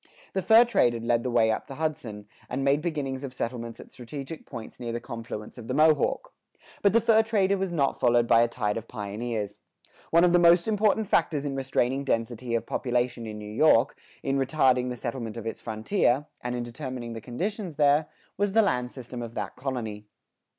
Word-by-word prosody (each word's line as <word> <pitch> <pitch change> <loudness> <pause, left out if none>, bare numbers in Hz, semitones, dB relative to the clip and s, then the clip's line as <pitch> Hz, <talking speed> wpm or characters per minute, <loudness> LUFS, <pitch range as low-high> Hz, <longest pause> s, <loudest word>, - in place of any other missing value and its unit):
The 190 - 0
fur 225 +5 +7
trade 125 - +3
had 115 - -5
led 115 0 +2
the 125 - -2
way 115 -2 +3
up 110 - -3
the 135 - -8
Hudson, 125 -10 -4 0.2
and 130 +2 -2
made 140 +2 +3
beginnings 145 -5 -3
of 130 -2 -6
settlements 115 -1 -4
at - - -12
strategic 135 +5 -8
points 115 -1 -9
near 120 -2 -4
the 120 - -3
confluence 115 -2 -7
of 115 - -9
the - - -2
Mohawk. 155 -2 +3 0.5
But 200 - +4
the 230 - +6
fur 225 0 +5
trader 205 -3 +2
was 190 -2 -2
not 140 -5 0
followed 120 -1 +4
by 115 - +6
a 120 - +4
tide 110 -3 -2
of 115 0 -6
pioneers. 105 -1 -4 0.5
One 170 +1 +5
of 175 -1 +4
the 175 - +6
most 170 +1 +5
important 215 0 +2
factors 150 -6 +1
in 140 -1 -2
restraining 135 0 0
density 115 -1 -1
of 115 - -1
population 120 -2 -1
in 105 -1 -6
New 105 0 -8
York, 135 0 +4 0.3
in 135 0 0
retarding 130 -2 +2
the 125 - -4
settlement 115 -2 -5
of 115 - -6
its 115 - -5
frontier, 120 - +1 0.2
and 125 0 -2
in 120 - -2
determining 120 -1 -6
the 115 - -7
conditions 180 - -4
there, 145 +1 +3 0.3
was 200 0 0
the 225 0 +5
land 125 -10 0
system 125 -1 -8
of 115 -1 -7
that 100 -3 -4
colony. 110 -6 -4
125 Hz, 205 wpm, -27 LUFS, 115-155 Hz, 0.5 s, fur